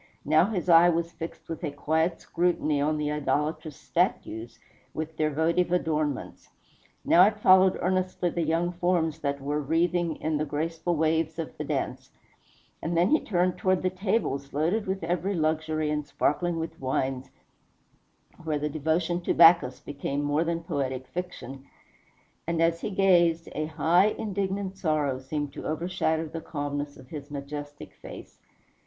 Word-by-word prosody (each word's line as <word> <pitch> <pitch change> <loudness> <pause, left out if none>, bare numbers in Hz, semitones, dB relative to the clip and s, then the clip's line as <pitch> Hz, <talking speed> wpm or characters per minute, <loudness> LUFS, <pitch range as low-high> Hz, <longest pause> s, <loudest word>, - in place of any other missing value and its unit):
Now 155 +3 +5
his 190 -4 -3
eye 170 0 +7
was 170 0 0
fixed 165 0 -8
with 165 +2 -6
a 155 - 0
quiet 160 +4 0
scrutiny 160 -4 0
on 155 +1 +1
the 150 0 -1
idolatrous 150 +1 -1
statues, 115 +2 -2 0.4
with 160 0 -4
their 155 0 +1
votive 165 +4 +1
adornments 155 -5 -1 0.6
now 175 - +7
it 210 0 -1
followed 190 -1 +6
earnestly 185 -1 0
the 170 - -2
young 165 +2 +1
forms 175 -3 0
that 140 -2 -2
were 145 +2 -2
wreathing 165 +2 +1
in 155 -1 -1
the - - +1
graceful 165 +3 -2
waves 160 0 +1
of 165 -2 -5
the - - -4
dance; - - -3 0.7
and 165 +1 -2
then 175 +4 +3
he 310 - +5
turned 180 -2 0
toward 185 -1 +1
the 185 - +1
tables, 185 -8 -1
loaded 175 +9 0
with 190 -1 -2
every 180 +4 -1
luxury 155 -1 0
and 150 -1 -2
sparkling 175 +3 0
with 160 0 -5
wines, 130 0 -2 1.1
where 155 -2 -1
the 150 +1 -2
devotion 160 +4 0
to - - -1
Bacchus 165 -6 +6
became 145 0 -4
more 145 +2 +1
than 170 0 -2
poetic 135 -5 -3
fiction; 135 -5 -7 0.8
and 170 -1 -1
as 165 0 +2
he - - -2
gazed, 175 -4 +3
a 155 +1 -2
high, 165 +5 +3
indignant 195 -2 -3
sorrow 150 -5 0
seemed 145 +1 -4
to - - -6
overshadow 160 0 -1
the 165 +2 -6
calmness 145 -1 -4
of 130 -1 -15
his 145 -2 -8
majestic 145 +1 -7
face. - - -11
160 Hz, 160 wpm, -27 LUFS, 150-175 Hz, 1.1 s, eye